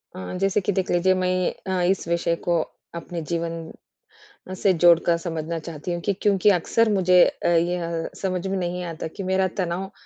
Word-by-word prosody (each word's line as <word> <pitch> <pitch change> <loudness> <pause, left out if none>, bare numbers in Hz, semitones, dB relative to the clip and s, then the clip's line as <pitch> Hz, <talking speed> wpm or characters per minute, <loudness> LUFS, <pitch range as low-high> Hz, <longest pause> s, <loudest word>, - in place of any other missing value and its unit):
अ, 90 -1 -6
जैसे 195 +1 +2
कि 185 - 0
देख 190 -1 -1
लीजिए 180 +2 +3
मैं 185 0 0
अ, 185 -1 0
इस 190 -3 -3
विषय 170 0 +1
को 170 -2 +3 0.3
अपने 170 0 -5
जीवन 165 -1 -3 0.8
से 195 +1 +2
जोड़कर 170 0 +5
समझना 165 -1 -4
चाहती 160 +1 -6
हूँ 170 - -4
कि 200 - +3
क्योंकि 205 -1 +3
अक्सर 230 +6 +1
मुझे 180 -2 +5
अ, - - -2
यह 170 -1 0
समझ 185 -1 -2
में 195 0 -1
नहीं 180 0 -3
आता 160 - -5
कि 195 - -4
मेरा 190 0 +2
तनाव 185 +2 -3
175 Hz, 180 wpm, -24 LUFS, 170-190 Hz, 0.8 s, जोड़कर